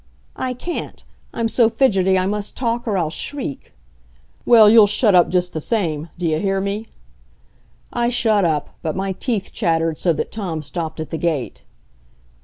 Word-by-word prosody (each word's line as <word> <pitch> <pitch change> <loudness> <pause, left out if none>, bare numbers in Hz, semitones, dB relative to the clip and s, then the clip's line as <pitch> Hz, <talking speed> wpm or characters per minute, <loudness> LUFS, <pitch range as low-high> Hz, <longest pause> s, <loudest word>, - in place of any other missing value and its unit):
"I 255 -1 -3
can't. 345 +7 -6 0.3
I'm 230 -1 -1
so 225 0 +3
fidgety 190 -7 +2
I 185 - +1
must 205 +1 -3
talk 240 -1 -2
or 205 -3 0
I'll 165 -4 -1
shriek." 265 - -5 0.8
"Well, 225 -3 +8
you'll 215 -1 +7
shut 210 0 +2
up 175 -1 +5
just 180 0 0
the 155 - -3
same. 165 -7 -2
Do 175 - -3
you 155 -1 +1
hear 195 0 0
me?" 200 +3 -3 1.1
I 240 0 +1
shut 220 -4 +2
up, 155 -4 0
but 160 -2 -3
my 190 +1 -2
teeth 205 0 -3
chattered 165 -1 0
so 175 - +2
that - - -4
Tom 175 -8 -4
stopped 160 +2 -5
at 155 - -5
the 160 - -3
gate. 155 -7 -2
195 Hz, 175 wpm, -20 LUFS, 165-225 Hz, 1.1 s, Well